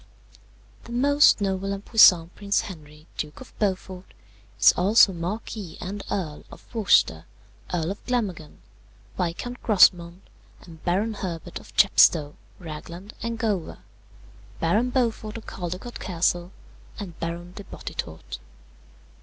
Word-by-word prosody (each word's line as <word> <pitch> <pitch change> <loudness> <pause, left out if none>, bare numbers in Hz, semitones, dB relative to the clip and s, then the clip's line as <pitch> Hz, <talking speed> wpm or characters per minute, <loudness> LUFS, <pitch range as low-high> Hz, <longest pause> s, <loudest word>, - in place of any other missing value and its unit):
The 235 - -11
most 285 0 +4
noble 195 0 -1
and 200 +1 -7
puissant 180 -7 +6
Prince 200 0 0
Henry, 155 -7 -11
Duke 150 -1 -5
of 260 - -13
Beaufort, 190 -2 -3 0.4
is - - +8
also 195 +2 +5
Marquis 180 +1 -5
and 200 +3 -5
Earl 170 -7 -3
of - - -14
Worcester, 185 - +3 0.5
Earl 170 0 -1
of 200 - -8
Glamorgan, 200 -11 -3 0.5
Viscount 185 +8 -4
Grosmont, 180 -4 +4 0.4
and 160 -2 -14
Baron 200 +6 0
Herbert 175 -6 -6
of - - -17
Chepstow, 150 -2 +5 0.2
Ragland, 170 +4 -9
and 230 0 -3
Gower, 210 -7 -2 0.8
Baron 210 +10 +1
Beaufort 230 -4 -1
of 225 - -10
Caldecott 180 +6 -6
Castle, 175 0 -1 0.5
and 185 -5 -8
Baron 170 +1 -5
de 205 - -9
Bottetourt. 80 - -7
185 Hz, 120 wpm, -25 LUFS, 170-215 Hz, 0.8 s, is